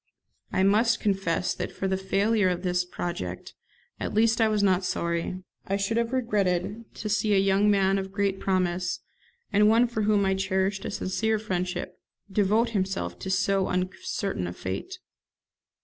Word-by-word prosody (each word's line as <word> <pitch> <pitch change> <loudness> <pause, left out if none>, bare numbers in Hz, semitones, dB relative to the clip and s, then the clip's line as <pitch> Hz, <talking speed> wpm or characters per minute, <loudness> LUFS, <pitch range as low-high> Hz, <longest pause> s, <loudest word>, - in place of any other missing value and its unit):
I 190 - +2
must 220 +4 +3
confess 190 -4 0
that - - -4
for 195 - -3
the 190 - +1
failure 195 +2 +2
of 180 0 -2
this 180 -1 +1
project, 95 - -5 0.5
at - - -3
least 225 +1 +3
I 220 - +5
was 210 -1 +1
not 190 -1 +3
sorry. 170 +1 -2 0.2
I 195 - 0
should 200 +3 -1
have 235 0 0
regretted 210 -4 0
to 215 - -5
see 210 0 +2
a - - +4
young 195 +1 +3
man 195 -1 +3
of 190 0 -5
great 200 -1 0
promise, 180 -2 0 0.5
and 210 +1 +5
one 230 +2 +5
for 230 -2 -3
whom 205 -1 +3
I 190 - +2
cherished 190 0 -1
a - - -2
sincere 220 +4 0
friendship, 185 -4 -3 0.3
devote 210 +4 +2
himself 190 - -2
to - - -5
so 190 0 +1
uncertain 185 - -2
a 90 - -5
fate. 95 +2 -5
195 Hz, 165 wpm, -27 LUFS, 185-210 Hz, 0.5 s, I